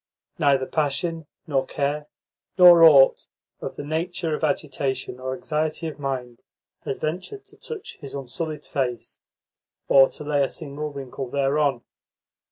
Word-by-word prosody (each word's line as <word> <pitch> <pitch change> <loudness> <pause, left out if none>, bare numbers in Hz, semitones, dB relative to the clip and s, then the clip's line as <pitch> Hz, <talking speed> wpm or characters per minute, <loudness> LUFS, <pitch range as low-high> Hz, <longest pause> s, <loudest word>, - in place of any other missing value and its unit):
Neither 135 -2 +3
passion 155 +3 -2 0.2
nor 140 -5 +1
care 145 +1 -2 0.5
nor 175 -2 +9
aught 140 -5 +7 0.3
of - - -6
the - - -6
nature 160 +2 -2
of - - -3
agitation 135 -7 -2
or 130 0 -3
anxiety 155 +3 -2
of 150 -2 -7
mind 125 -4 -4 0.4
had 135 - -4
ventured 185 - -4
to - - -19
touch 455 -4 -8
his 140 -3 -9
unsullied 145 +3 -5
face, 125 -5 -3 0.7
or 135 -1 +6
to - - -9
lay 145 -1 +1
a 135 - 0
single 150 -1 -6
wrinkle 135 -2 -6
thereon. 140 -1 +1
145 Hz, 140 wpm, -24 LUFS, 135-155 Hz, 0.7 s, nor